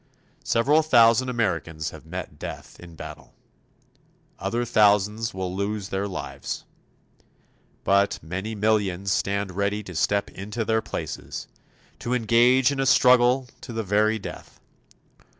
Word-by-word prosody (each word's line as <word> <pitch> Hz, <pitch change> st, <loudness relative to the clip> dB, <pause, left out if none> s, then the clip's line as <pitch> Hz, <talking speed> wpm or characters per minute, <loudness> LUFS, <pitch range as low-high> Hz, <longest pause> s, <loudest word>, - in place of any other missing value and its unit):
Several 145 Hz, +7 st, +3 dB
thousand 120 Hz, -4 st, +5 dB
Americans 85 Hz, -9 st, -2 dB
have 80 Hz, 0 st, -13 dB
met 85 Hz, -4 st, -7 dB
death -, -, -8 dB
in 85 Hz, -2 st, -12 dB
battle. 80 Hz, -1 st, -10 dB, 1.0 s
Other 120 Hz, +1 st, -1 dB
thousands 105 Hz, 0 st, +3 dB
will 95 Hz, -1 st, -4 dB
lose 100 Hz, 0 st, -3 dB
their 95 Hz, +1 st, -2 dB
lives. 95 Hz, -, -5 dB, 1.2 s
But 100 Hz, 0 st, +3 dB
many 95 Hz, +7 st, -4 dB
millions 100 Hz, -3 st, 0 dB
stand 100 Hz, 0 st, 0 dB
ready 100 Hz, +2 st, -1 dB
to 95 Hz, -, -9 dB
step 100 Hz, +5 st, 0 dB
into 105 Hz, +4 st, -5 dB
their 110 Hz, +1 st, +1 dB
places -, -, -6 dB, 0.5 s
to 125 Hz, +1 st, -1 dB
engage 120 Hz, +3 st, +4 dB
in 140 Hz, -, -3 dB
a 135 Hz, -, +1 dB
struggle 125 Hz, +1 st, +5 dB
to 125 Hz, -, -8 dB
the 115 Hz, 0 st, -2 dB
very 105 Hz, +2 st, +2 dB
death. 105 Hz, -, -9 dB
105 Hz, 130 wpm, -25 LUFS, 95-115 Hz, 1.2 s, thousand